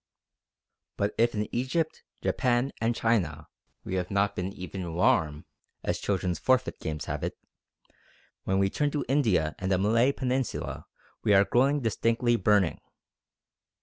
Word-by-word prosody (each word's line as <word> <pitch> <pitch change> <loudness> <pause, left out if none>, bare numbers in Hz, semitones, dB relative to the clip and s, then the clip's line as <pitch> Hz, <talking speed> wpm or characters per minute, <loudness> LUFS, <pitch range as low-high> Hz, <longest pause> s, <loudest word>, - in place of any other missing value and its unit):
But 100 +1 0
if 120 0 +3
in 105 0 -1
Egypt, 140 +6 -1 0.2
Japan, 125 0 +1
and 115 +1 +1
China 85 -11 0 0.4
we - - -5
have 90 -1 -2
not 100 0 +1
been 90 +1 -3
even 90 -3 -6
"warm" 75 -3 +2 0.4
as - - -1
children's 90 -4 -1
forfeit 130 -1 +1
games 75 -1 -4
have - - -4
it, - - -3 1.1
when 95 - 0
we 95 0 +3
turn 150 -1 +1
to 145 0 -2
India 110 - +2
and 95 +1 -2
the 95 - +4
Malay 115 +7 +3
Peninsula 130 -1 -3 0.4
we 105 - +4
are 100 +1 +6
growing 140 +6 +2
distinctly 115 +1 +1
"burning." 100 -4 +2
105 Hz, 145 wpm, -28 LUFS, 95-125 Hz, 1.1 s, are